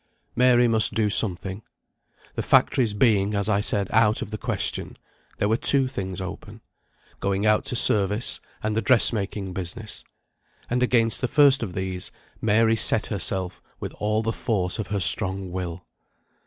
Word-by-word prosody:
Mary 125 0 +3
must 110 -2 +2
do 105 -2 0
something. 95 -1 +2 0.7
The - - -4
factories 115 -6 +1
being, 105 -2 +1
as 100 0 -2
I 100 -2 0
said, 100 -1 +1
out 110 -1 +1
of 105 - -11
the 110 - -5
question, - - -2 0.4
there 105 - -1
were 110 +2 0
two 135 +1 +3
things 95 -8 -6
open 95 -1 -9 0.6
going 100 +1 -2
out 105 +3 +1
to 135 -2 -3
service, 105 0 +2 0.2
and 110 0 -2
the 110 - 0
dressmaking 105 -4 +2
business; 95 +4 -7 0.7
and 125 0 -1
against 115 -2 +2
the 130 - -1
first 140 -1 +4
of 100 -6 -5
these, 95 -1 -4 0.3
Mary 110 +1 +2
set 110 0 +3
herself 95 -2 -3 0.2
with - - -7
all 105 +1 -1
the 115 +1 -2
force 100 -4 -2
of 110 - -4
her 105 -1 -3
strong 95 +1 +3
will. 90 -1 -6
105 Hz, 160 wpm, -23 LUFS, 95-115 Hz, 0.7 s, first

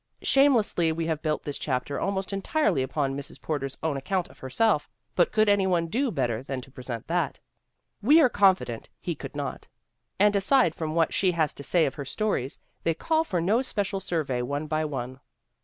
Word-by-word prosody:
Shamelessly 235 - +3
we 165 +1 -2
have 160 -2 -1
built 155 -1 -1
this 145 - -4
chapter 130 0 -2
almost 195 0 -2
en 195 - -2
tifely 300 - +1
upon 135 +1 -1
Mrs. 140 0 -8
Porter's 135 -4 -3
own 155 -3 0
account 180 +6 -2
of - - -18
herself 150 - +1 0.3
but 175 - +3
could 215 0 +3
any 205 -2 +3
one 175 -2 +2
do 245 +11 0
better 125 - -1
than 135 0 -4
to 135 - -14
present 125 -4 -6
that? - - -1 0.6
We 290 +10 +6
are 300 - +7
confident 190 - +2
he - - -3
could - - -9
not. - - -5 0.5
And 205 +1 +5
aside 200 - +3
from 160 -1 -4
what 165 -1 +2
she 185 -2 +2
has 160 -3 +1
to - - -10
say 165 +3 +2
of 135 - -2
her 145 - -6
v - - -7
stories 200 - -1 0.2
they 165 - 0
call 320 - +1
for 185 - -2
no 210 +8 +2
special 200 -6 -1
survey 155 -9 -1
one 145 +4 -2
by 155 0 -1
one. 130 -3 -5
165 Hz, 205 wpm, -27 LUFS, 140-200 Hz, 0.6 s, are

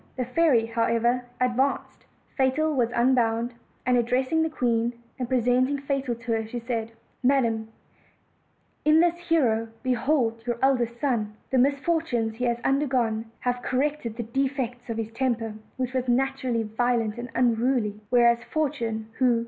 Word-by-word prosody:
The 250 - -1
fairy, 255 -3 +3
however, 230 +2 +1
advanced; 255 +2 0 0.3
Fatal 285 +4 +2
was 245 -4 +1
un 250 +2 +3
bound, 235 0 +1 0.3
and 250 -1 +3
addressing 255 +6 +1
the 320 - +1
queen, 240 -4 0 0.3
and 250 -2 -3
presenting 255 +2 +2
Fatal 275 -3 -2
to 230 +1 -6
her, 225 0 +1
she 240 - -5
said: 230 -1 -3 0.3
"Madam, 235 -4 +2 1.2
in 305 +1 +5
this 345 0 +4
hero 230 -9 +2 0.2
behold 250 -2 +1
your 240 -1 0
eld 265 -2 +4
est 235 0 -3
son; 230 -7 0 0.2
the 260 - +3
misfortunes 275 -5 +1
he 250 - -1
has 235 -1 +1
undergone 255 -5 +1 0.2
have 245 0 -1
corrected 260 -3 -1
the 240 - -2
defects 250 0 -2
of 230 - -3
his 225 -1 -3
temper, 230 -2 -1 0.2
which 255 -1 -2
was 255 -1 -1
naturally 255 -2 +1
violent 230 0 0
and 245 +1 -6
unruly; 235 -3 +1
whereas 235 -1 +4
Fortune, 235 -8 -2
who. 245 -3 +4
245 Hz, 150 wpm, -26 LUFS, 230-265 Hz, 1.2 s, in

